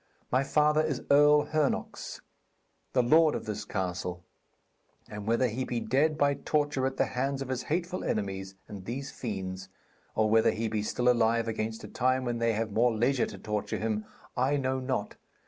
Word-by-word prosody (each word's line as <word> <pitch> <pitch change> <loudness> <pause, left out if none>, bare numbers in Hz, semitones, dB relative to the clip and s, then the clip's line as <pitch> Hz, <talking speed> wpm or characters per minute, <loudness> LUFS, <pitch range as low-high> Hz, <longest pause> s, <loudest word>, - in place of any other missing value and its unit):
'My 130 +2 +3
father 150 +2 +3
is 155 -4 -2
Earl 150 +1 +6
Hernox, 155 -2 -2 0.7
the 125 - +4
lord 155 +5 +5
of - - -4
this 105 -1 -4
castle. 90 -3 -3 0.8
And 105 0 -7
whether 115 +3 +3
he 120 +3 -2
be 120 -2 -2
dead 145 +7 +1
by 145 -1 +3
torture 145 -2 0
at 135 0 -5
the - - +3
hands 135 +2 -1
of 135 - -10
his 130 -1 -1
hateful 175 +3 -2
enemies 95 -2 -3
and 100 -3 -9
these 135 +5 -4
fiends, 95 -4 -5 0.5
or 110 0 +3
whether 110 +1 +4
he 115 +1 -1
be 110 -1 -1
still 125 +4 -1
alive 115 -1 +3
against 110 0 -3
a - - -6
time 130 0 +1
when 120 -1 -1
they 115 -1 +2
have 110 0 -2
more 120 +4 +3
leisure 120 +4 +1
to - - -8
torture 105 -1 -3
him, 110 -1 -1 0.3
I 135 +3 +2
know 130 -1 0
not. 130 -5 -3
120 Hz, 180 wpm, -29 LUFS, 110-140 Hz, 0.8 s, Earl